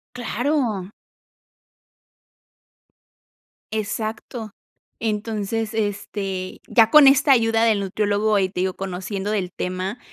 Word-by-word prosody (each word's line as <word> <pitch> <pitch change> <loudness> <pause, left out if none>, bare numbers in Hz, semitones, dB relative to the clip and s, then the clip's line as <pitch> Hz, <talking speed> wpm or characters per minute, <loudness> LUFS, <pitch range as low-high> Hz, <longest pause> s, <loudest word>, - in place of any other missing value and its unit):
Claro. 240 -5 -1 2.8
Exacto. 220 +1 -4 0.5
Entonces, 220 0 -2
este, 200 -3 -3
ya 225 -2 +5
con 300 -2 +8
esta 275 +1 +6
ayuda 225 -2 +3
del 220 -3 +3
nutriólogo, 205 +2 0
ahí 190 -2 +2
te 180 - -4
digo, 185 0 0
conociendo 195 +2 -4
del 195 -4 -1
tema, 185 +5 -3
215 Hz, 95 wpm, -22 LUFS, 195-225 Hz, 2.8 s, con